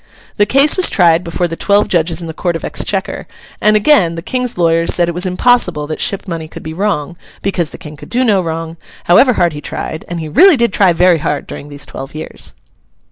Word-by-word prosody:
This 205 - +3
case 275 - +3
was 370 - +4
tried 170 -2 +3
before 175 +1 -2
the 165 - -6
twelve 205 +4 +2
judges 165 -1 0
in - - -6
the 160 - -6
Court 170 +1 -2
of 165 - -5
Exchequer, - - -3 0.3
and 215 0 +4
again 205 - +3
the 165 - -7
King's 250 +1 -3
lawyers 165 -1 +2
said 175 -1 +2
it 170 - -2
was 180 +2 -1
impossible 180 -5 +1
that 155 +1 -5
ship 200 0 0
money 165 -3 -5
could - - -11
be 160 - -6
wrong, 175 -4 -2 0.3
because 180 -5 -1
the - - -11
King 150 0 -11
could - - -13
do 250 +2 +1
no 205 -5 +2
wrong, 165 -1 -5 0.3
however 250 +9 +4
hard 175 -6 +1
he 145 - -7
tried—and 170 +3 -6
he 160 - -5
really 340 - +5
did 235 -1 +1
try 195 -4 +4
very 175 0 +3
hard 150 -1 -3
during 145 - -9
these 145 -1 -7
twelve 135 +2 -9
years. 155 - -9
175 Hz, 225 wpm, -14 LUFS, 160-205 Hz, 0.3 s, really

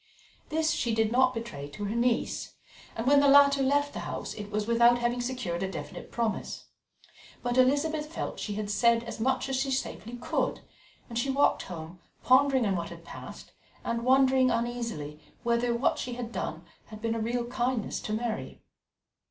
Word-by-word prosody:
This 315 +1 +1
she 235 -8 0
did 220 -1 +2
not 255 +1 +4
betray 230 - -6
to 205 +8 -7
her 205 +3 -2
niece, 235 0 0 0.4
and 225 - -3
when 285 +2 +6
the 285 - +4
latter 280 0 +7
left 285 +2 +2
the - - -4
house - - -5
it 205 -1 -7
was 210 0 -1
without 235 +1 +5
having 240 0 0
secured 240 -9 -3
a 190 - -1
definite - - -7
promise, 230 -3 -2 0.8
but 245 0 0
Elizabeth 300 +4 +2
felt - - -4
she 205 - -3
had 210 0 -3
said 230 +2 +3
as 230 0 -7
much 260 +3 +1
as 265 -1 -1
she 270 +1 0
safely 260 -3 -3
could, - - -1 0.5
and 235 -1 -3
she 270 - -1
walked 275 +2 +3
home, 170 0 -8 0.2
pondering 265 -1 +4
on 195 -2 +1
what 170 -1 -3
had 170 -1 -11
passed, - - -10 0.3
and 235 0 -2
wondering 260 0 +4
uneasily 230 -11 -3 0.2
whether 235 0 +1
what 235 +3 +1
she 250 - -4
had 235 -1 -5
done - - -4 0.2
had 215 -2 -10
been 225 +1 -1
a 230 - -2
real 235 +2 -1
kindness 245 -2 -1
to - - -6
Mary. 220 0 -3
240 Hz, 185 wpm, -29 LUFS, 220-260 Hz, 0.8 s, latter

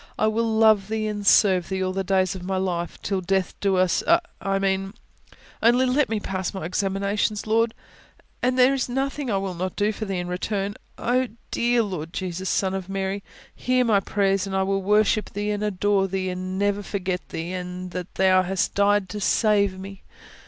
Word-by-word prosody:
I - - +2
will 225 +1 +1
love 220 -3 +4
Thee 220 0 -2
and 205 -1 -3
serve 185 -5 +5
Thee, 190 -1 -1
all 185 0 -1
the 195 0 -1
days 190 -1 +1
of 190 - -7
my 190 +1 -2
life, 175 -2 -2
till 195 -2 -1
death 190 +2 -1
us 185 -3 +2
do... 340 - +5 0.2
I 195 0 0
mean, 195 +1 -1 0.7
only 240 +3 +4
let 265 +3 +2
me 220 -1 0
pass 190 -2 -3
my 190 - -4
examinations, 200 +3 -1
Lord, 225 +1 +1 0.7
and 255 +1 +1
there 255 +1 +5
is 265 -2 -1
nothing 270 +1 -2
I 200 - +1
will 195 -1 -3
not 185 +2 -4
do 210 +1 +1
for 215 0 -5
Thee 195 -2 -3
in 175 0 -3
return. 195 +2 -2 0.2
Oh, 255 +2 +1 0.2
dear 240 0 +2
Lord 175 -5 -5
Jesus, 185 0 -3
Son 190 -1 +1
of 190 -1 -4
Mary, 195 +1 -2 0.3
hear 255 0 +1
my 215 -4 +4
prayer, 195 0 +1
and 195 -1 -4
I 190 - +2
will 195 0 0
worship 210 +2 +2
Thee 205 +1 -2
and 205 0 -2
adore 205 -1 +1
Thee, 190 0 -2
and 185 +1 -4
never 205 0 +1
forget 190 -2 -3
Thee, 165 +2 -4
and 180 0 -5
that 180 0 -6
Thou 185 -1 +4
hast 185 0 -1
died 200 -1 +3
to 210 - -5
save 200 -3 +2
me! 195 0 -9
195 Hz, 200 wpm, -24 LUFS, 185-215 Hz, 0.7 s, serve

